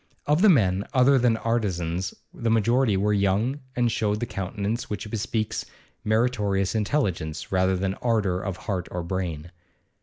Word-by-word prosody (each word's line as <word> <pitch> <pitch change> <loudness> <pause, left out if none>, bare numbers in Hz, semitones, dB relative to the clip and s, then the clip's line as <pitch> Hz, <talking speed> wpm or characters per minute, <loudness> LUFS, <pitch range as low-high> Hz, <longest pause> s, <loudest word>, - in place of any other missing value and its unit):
Of 150 +4 +2
the 215 - +7
men 100 - +3
other 130 +1 +5
than 120 -2 +3
artisans 95 -6 -1 0.2
the 115 - -2
majority 115 0 +3
were 105 +2 +1
young, 105 +7 +1 0.2
and 120 -1 +2
showed 105 -1 0
the 120 - -1
countenance 100 +3 -3
which 105 +1 -4
bespeaks 110 0 -2 0.4
meritorious 105 -4 +1
intelligence 100 - -1
rather 95 0 +2
than 95 +1 -1
ardour 105 -6 +1
of 95 -3 -4
heart 95 -5 -2
or 90 -1 -4
brain. 85 -2 -4
105 Hz, 150 wpm, -25 LUFS, 95-115 Hz, 0.4 s, the